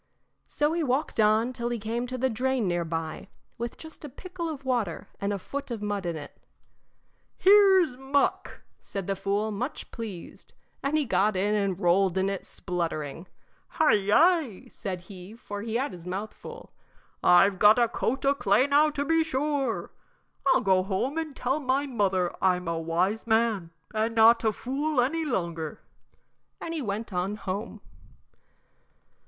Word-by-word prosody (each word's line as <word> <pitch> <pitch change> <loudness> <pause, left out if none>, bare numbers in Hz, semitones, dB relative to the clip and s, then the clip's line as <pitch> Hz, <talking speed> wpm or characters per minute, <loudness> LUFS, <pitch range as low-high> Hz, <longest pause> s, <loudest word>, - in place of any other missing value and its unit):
So 295 +2 0
he 340 - 0
walked 275 -2 -1
on 220 +3 +3
till 240 -1 -3
he 240 - -2
came 230 +3 -3
to 255 +1 -4
the 260 +1 +1
drain 255 -1 0
near 175 -1 0
by, 165 +1 -4 0.3
with 235 0 -4
just 320 0 -12
a 295 - -6
pickle 350 +4 -6
of 280 -4 -7
water 235 -10 -1
and 200 +1 0
a 200 - -1
foot 280 +9 -6
of 225 -4 -5
mud 205 -3 -2
in 170 - -2
it. 145 -2 -9 1.0
"Here's 385 -7 +6
muck," 270 +2 -1 0.2
said 195 -2 -6
the 195 - -1
fool, 205 +3 -1
much 245 +8 -5
pleased, 210 -7 -9 0.3
and 285 +3 0
he 300 - +1
got 200 -1 +2
in 200 +3 +1
and 200 -3 0
rolled 185 0 +3
in 190 +1 +1
it 195 - -5
spluttering. 165 -2 -4 0.4
"Hi, 315 -6 +3
yi!" 250 - +3
said 185 -7 -5
he 185 +2 -11
for 205 -3 -7
he 225 +1 -4
had 265 +4 0
his 175 -1 -10
mouth 195 +4 -4
full 475 +1 -11 0.5
"I've 190 +1 +5
got 210 +2 +7
a 240 -1 +4
coat 260 +3 -2
o' 280 - +5
clay 215 -2 +3
now 290 +2 +4
to 285 -1 -3
be 325 +1 +3
sure. 285 -4 -1 0.6
I'll 355 - +5
go 190 -1 +3
home 210 +11 -1
and 310 -4 -5
tell 265 +4 -1
my 270 0 0
mother 195 -8 0
I'm 180 -2 +2
a 165 -1 -1
wise 180 +8 -1
man 220 -6 +1 0.2
and 220 +1 0
not 230 +1 +6
a 220 - +3
fool 275 +6 -2
any 305 +7 +1
longer." 170 - -3 0.8
And 330 - -5
he 320 - -2
went 215 -1 -4
on 180 +3 -1
home. 205 +2 -5
220 Hz, 170 wpm, -27 LUFS, 190-275 Hz, 1.0 s, got